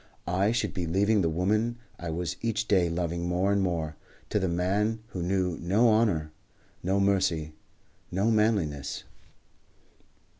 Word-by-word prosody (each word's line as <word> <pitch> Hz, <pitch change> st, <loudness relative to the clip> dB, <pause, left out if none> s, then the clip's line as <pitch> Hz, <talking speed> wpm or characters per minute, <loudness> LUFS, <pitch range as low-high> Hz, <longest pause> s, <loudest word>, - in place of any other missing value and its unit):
I 95 Hz, +4 st, +2 dB
should 120 Hz, -1 st, -1 dB
be 90 Hz, -3 st, -2 dB
leaving 100 Hz, +5 st, +3 dB
the 85 Hz, -, +2 dB
woman 105 Hz, +8 st, 0 dB, 0.2 s
I 85 Hz, -, -5 dB
was 85 Hz, 0 st, -2 dB
each 110 Hz, -1 st, -1 dB
day 90 Hz, -5 st, +3 dB
loving 85 Hz, 0 st, -2 dB
more 90 Hz, +3 st, +1 dB
and 100 Hz, 0 st, +2 dB
more, 80 Hz, -4 st, -2 dB, 0.3 s
to 105 Hz, -, +2 dB
the 95 Hz, -, 0 dB
man 100 Hz, +6 st, 0 dB
who 90 Hz, -, -5 dB
knew 90 Hz, -1 st, 0 dB
no 100 Hz, +8 st, +3 dB
honour, 100 Hz, -9 st, +2 dB, 0.5 s
no 95 Hz, +2 st, +1 dB
mercy, 95 Hz, -6 st, +1 dB, 0.6 s
no 100 Hz, +6 st, +2 dB
manliness. 100 Hz, -10 st, 0 dB
95 Hz, 145 wpm, -28 LUFS, 85-105 Hz, 0.6 s, leaving